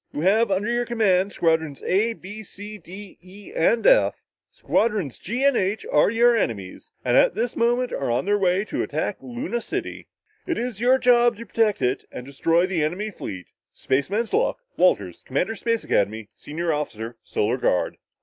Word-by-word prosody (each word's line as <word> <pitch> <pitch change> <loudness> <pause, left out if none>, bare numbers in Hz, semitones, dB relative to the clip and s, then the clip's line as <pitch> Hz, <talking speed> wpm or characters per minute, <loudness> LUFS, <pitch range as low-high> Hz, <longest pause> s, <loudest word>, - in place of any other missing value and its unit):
You 145 - -3
have 210 +6 +3
under 200 +4 0
your 240 0 0
command, 205 -5 +2
Squadrons 160 -5 0
A 215 +5 +1
B 210 0 -9
C 210 +1 -9
D 195 +2 -11
E 195 - -13
F. - - +3 0.3
Squadrons 210 - -1
G 245 +4 -3
and 280 -2 +4
H 200 +1 -1
are 150 - +4
your 235 +2 +4
enemies, 100 - -3
and - - +2
at - - +4
this 230 +2 -2
moment 240 +2 +1
are 135 - -2
on 120 +5 0
their 205 +1 +2
way 190 +1 +2
to - - -3
attack 155 +6 -2
Luna 135 - -4
City. - - -5 0.4
It 340 - -1
is 235 -3 -4
your 255 +2 +5
job 240 -3 +4
to 230 - -8
protect 220 -3 +1
it 125 - 0
and 125 - -8
destroy 165 +6 +1
the 185 -5 -1
enemy 190 +8 -2
fleet. 95 - -7 0.3
Spaceman's 195 - -1
luck! - - +2 0.2
Walters, 100 - +1
Commander 180 +11 -1
Space 230 +1 -1
Academy, 105 +1 0
Senior 165 +2 -3
Officer 115 -6 -4
Solar 115 +4 -1
Guard." 90 -7 0
195 Hz, 175 wpm, -23 LUFS, 150-230 Hz, 0.4 s, your